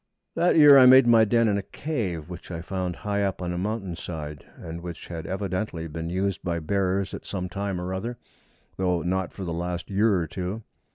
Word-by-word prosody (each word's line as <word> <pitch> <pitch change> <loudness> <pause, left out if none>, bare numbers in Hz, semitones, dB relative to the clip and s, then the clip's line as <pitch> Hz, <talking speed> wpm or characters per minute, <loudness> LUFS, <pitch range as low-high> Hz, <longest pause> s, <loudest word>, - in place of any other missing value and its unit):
That 175 - +2
year 145 -3 +9
I 130 - +8
made 130 0 +8
my 115 -2 +6
den 115 +1 +3
in 100 -1 +2
a - - -2
cave 95 - -4
which 90 -1 -9
I 85 -2 -5
found 90 -1 -3
high 100 +2 -2
up 100 -2 -1
on 90 -1 -3
a - - -3
mountain 100 -2 -3
side, 75 -4 -7
and 85 +1 -7
which 85 -1 -7
had 80 -2 -6
evidently 95 -3 -3
been 80 +1 -5
used 95 +2 -1
by 85 -1 -2
bears 95 +3 -1
at - - -6
some 90 -2 -4
time 100 0 -3
or 90 +1 -4
other, 115 +6 -4 0.6
though 90 -3 0
not 95 0 -1
for 100 - -8
the 85 -2 -3
last 85 +2 -4
year 105 +1 +3
or 85 -2 0
two. 90 +6 -5
95 Hz, 215 wpm, -26 LUFS, 85-100 Hz, 0.6 s, year